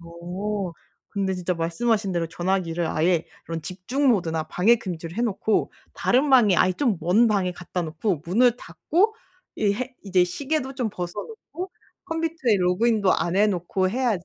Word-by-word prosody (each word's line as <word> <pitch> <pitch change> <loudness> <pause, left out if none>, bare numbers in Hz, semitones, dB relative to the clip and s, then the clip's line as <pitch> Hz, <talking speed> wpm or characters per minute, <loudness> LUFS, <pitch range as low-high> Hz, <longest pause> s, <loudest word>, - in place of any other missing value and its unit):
어. 180 +3 -4 0.4
근데 195 -2 -1
진짜 180 -1 -2
말씀하신 195 +5 0
대로 170 -2 -1
전화기를 175 -1 -1
아예 170 +1 +1 0.2
그런 165 -1 -5
집중 245 +10 -1
모드나 165 -8 +1
방해 215 +7 +4
금지로 175 -5 -6
해 235 - 0
놓고 220 -1 0 0.2
다른 270 +4 +2
방에 215 -9 +6
아예 185 - +4
좀 230 -2 +1
먼 200 +9 +4
방에 190 -4 +1
갖다 175 +1 -4
놓고 160 +1 -2
문을 240 +6 +4
닫고 410 - 0 0.4
이 205 -2 +2
해 255 +3 -5
이제 185 -3 +3
시계도 270 - -2
좀 245 -5 -2
벗어 180 +3 -5
놓고 370 -5 -8 0.4
컴퓨터에 325 -9 0
로그인도 200 +2 +2
안 175 +2 0
해 210 +1 +5
놓고 185 0 0
해야지 220 -5 0
195 Hz, 325 characters per minute, -24 LUFS, 175-240 Hz, 0.4 s, 방에